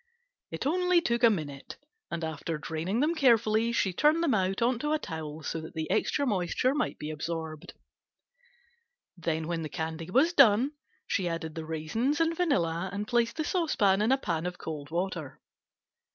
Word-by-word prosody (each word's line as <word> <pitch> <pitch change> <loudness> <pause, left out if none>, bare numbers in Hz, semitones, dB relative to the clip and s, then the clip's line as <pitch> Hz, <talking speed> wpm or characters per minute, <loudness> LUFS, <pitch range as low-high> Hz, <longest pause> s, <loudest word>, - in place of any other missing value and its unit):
It - - -5
only 360 +3 +3
took 235 -8 0
a 235 - +9
minute, 145 -9 -4 0.3
and 170 -1 -4
after 160 0 -3
draining 165 - -2
them 310 +3 +2
carefully 230 -6 +3
she 195 -5 +1
turned 305 - +3
them 315 - +2
out 190 -2 +1
on 240 0 +2
a 300 +1 +2
towel 160 - -6
so 165 - -3
that 160 - -10
the 160 -1 -3
extra 285 - +1
moisture 205 +3 +1
might 295 - -1
be 150 +1 -5
absorbed. 160 0 -5 1.4
Then 160 -2 -2
when 170 -1 -2
the 155 - -4
candy 160 +2 -4
was 290 - +3
done 260 -2 +6 0.3
she 185 -4 0
added 165 -1 -4
the 160 0 -6
raisins 220 - -1
and 330 0 +2
vanilla 185 - 0
and 205 +1 -4
placed 235 -1 +1
the 315 - -1
saucepan 240 - +2
in 220 +4 +2
a 265 - +5
pan 170 -8 -2
of 180 0 -5
cold 150 -3 -6
water. 170 -4 -3
190 Hz, 175 wpm, -29 LUFS, 160-260 Hz, 1.4 s, a